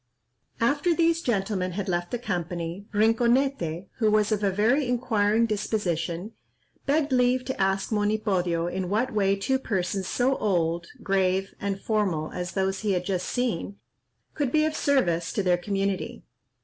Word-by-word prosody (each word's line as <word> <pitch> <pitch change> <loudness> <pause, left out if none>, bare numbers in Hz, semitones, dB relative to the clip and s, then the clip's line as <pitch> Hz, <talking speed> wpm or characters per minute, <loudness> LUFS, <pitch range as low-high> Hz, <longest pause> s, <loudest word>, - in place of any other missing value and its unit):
After 290 +8 +2
these 335 0 +2
gentlemen 195 - -1
had 200 +1 -3
left 175 -1 -1
the 245 - -2
company, 175 -3 -4
Rinconete, 225 - +2
who 220 -2 +3
was 215 0 +2
of 210 -1 0
a 200 - +3
very 235 +8 +2
inquiring 225 -3 +2
disposition, 195 -4 -2 0.6
begged 290 0 +2
leave 250 0 +2
to 260 -6 -3
ask 195 +2 +1
Monipodio 205 -5 +1
in 180 +1 -3
what 225 +6 0
way 200 -2 +2
two 265 +7 0
persons 190 -5 -2
so 260 +2 +1
old, 170 -4 0 0.2
grave, 190 -1 +1
and 200 -1 -2
formal 195 -8 -1
as 180 0 -4
those 190 0 0
he 210 -2 0
had 180 -1 -1
just 185 -2 -1
seen, 230 -6 -2 0.6
could 285 -5 -1
be 310 +1 +3
of 310 0 -1
service 175 - +1
to 205 - 0
their 180 -1 +3
community. 195 0 -2
205 Hz, 155 wpm, -26 LUFS, 185-240 Hz, 0.6 s, who